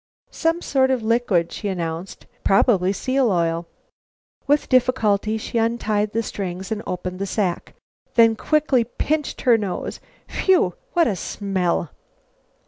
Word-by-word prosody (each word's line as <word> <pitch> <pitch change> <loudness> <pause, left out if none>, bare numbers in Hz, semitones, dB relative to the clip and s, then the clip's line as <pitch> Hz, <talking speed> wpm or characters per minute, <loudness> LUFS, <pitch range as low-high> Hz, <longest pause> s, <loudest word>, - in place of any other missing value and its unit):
"Some 330 +1 0
sort 265 -1 +2
of 255 -3 0
liquid," 220 -7 +1
she 210 - -5
announced. 170 -1 -4 0.2
"Probably 195 -2 +3
seal 255 +4 +1
oil." 170 -1 0 0.8
With 290 +1 +2
difficulty 220 -4 +2
she 230 +1 -2
untied 215 -2 0
the 230 +1 0
strings 190 -2 -5
and 215 -1 -2
opened 180 0 -4
the 195 - -2
sack. 185 -3 -2 0.4
Then 230 -1 +6
quickly 295 0 +2
she 230 - -5
pinched 300 -1 -1
her 240 -3 +4
nose. 200 -4 -4 0.3
"Whew! 360 - +2 0.2
What 345 -2 +4
a 215 - 0
smell!" 185 -3 -2
215 Hz, 135 wpm, -22 LUFS, 185-255 Hz, 0.8 s, Then